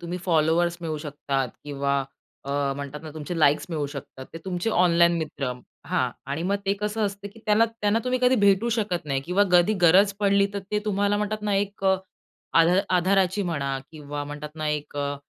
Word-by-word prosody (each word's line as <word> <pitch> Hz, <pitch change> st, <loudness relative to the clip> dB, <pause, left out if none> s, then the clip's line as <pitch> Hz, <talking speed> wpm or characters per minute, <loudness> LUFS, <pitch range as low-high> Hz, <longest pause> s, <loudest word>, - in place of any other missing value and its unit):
तुम्ही 175 Hz, +1 st, -5 dB
फॉलोवर्स 170 Hz, 0 st, +2 dB
मिळू 160 Hz, -2 st, -3 dB
शकतात 140 Hz, -3 st, -2 dB, 0.2 s
किंवा 140 Hz, -1 st, -1 dB, 0.4 s
अ, 140 Hz, -, -5 dB, 0.3 s
म्हणतात 140 Hz, +1 st, -6 dB
ना 155 Hz, -, -8 dB
तुमचे 160 Hz, +3 st, -5 dB
लाईक्स 150 Hz, 0 st, +3 dB
मिळू 150 Hz, -3 st, -1 dB
शकतात. 140 Hz, -2 st, -9 dB
ते 165 Hz, -, -7 dB
तुमचे 185 Hz, +3 st, -2 dB
ऑनलाईन 170 Hz, -2 st, +4 dB
मित्र, 145 Hz, -5 st, -3 dB, 0.3 s
हां. -, -, 0 dB, 0.2 s
आणि 140 Hz, +4 st, -3 dB
मग 200 Hz, +3 st, +1 dB
ते 195 Hz, -, +3 dB
कसं 210 Hz, +1 st, -2 dB
असतं 200 Hz, 0 st, -6 dB
की 225 Hz, -, -14 dB
त्यांला 215 Hz, +1 st, +5 dB
त्यांना 225 Hz, -1 st, 0 dB
तुम्ही 255 Hz, 0 st, 0 dB
कधी 250 Hz, +1 st, +5 dB
भेटू 200 Hz, +3 st, +4 dB
शकत 190 Hz, -6 st, -1 dB
नाही 135 Hz, -2 st, -1 dB
किंवा 180 Hz, +5 st, +2 dB
कधी 180 Hz, +4 st, +5 dB
गरज 190 Hz, +4 st, +6 dB
पडली 200 Hz, 0 st, +4 dB
तर -, -, -1 dB
ते 210 Hz, -, +1 dB
तुम्हाला 205 Hz, 0 st, +1 dB
म्हणतात 210 Hz, +1 st, -2 dB
ना, 205 Hz, -1 st, 0 dB
एक 200 Hz, 0 st, -2 dB
अ, 190 Hz, 0 st, +4 dB, 0.6 s
आध 165 Hz, 0 st, +6 dB, 0.3 s
आधाराची 190 Hz, +2 st, +2 dB
म्हणा 140 Hz, -4 st, -2 dB
किंवा 145 Hz, -2 st, -6 dB
म्हणतात 150 Hz, +1 st, -8 dB
ना 155 Hz, -1 st, -3 dB
एक 150 Hz, -1 st, -3 dB
अ, 145 Hz, 0 st, -1 dB
175 Hz, 190 wpm, -25 LUFS, 150-200 Hz, 0.6 s, गरज